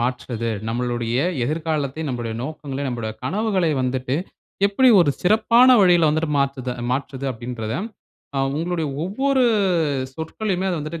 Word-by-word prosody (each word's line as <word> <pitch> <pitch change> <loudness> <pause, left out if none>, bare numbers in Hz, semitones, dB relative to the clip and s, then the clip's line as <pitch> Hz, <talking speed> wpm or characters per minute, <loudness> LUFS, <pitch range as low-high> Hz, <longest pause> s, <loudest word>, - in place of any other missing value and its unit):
மாற்றுது? 120 -1 -2 0.2
நம்மளுடைய 120 0 -1 0.3
எதிர்காலத்தை, 155 0 -2
நம்முடைய 120 -3 -3
நோக்கங்களை, 140 -1 -5
நம்முடைய 115 -3 -3
கனவுகளை 190 - 0
வந்துட்டு 130 +1 -1 0.5
எப்டி 230 +6 +3
ஒரு 155 -5 +4
சிறப்பான 230 +5 +5
வழியில 175 -4 +5
வந்துட்டு 155 0 -1
மாத்துது 135 -2 -1 0.2
மாற்றுது? 135 0 -3
அப்டின்றத, 115 -2 -5 0.6
அ - - +1 0.2
உங்களுடைய 170 -1 -1 0.2
ஒவ்வொரு 265 +8 +1 0.7
சொற்கலுமே 185 +4 -3
அத 180 - 0
வந்துட்டு 155 +3 -5
145 Hz, 120 wpm, -22 LUFS, 125-180 Hz, 0.7 s, சிறப்பான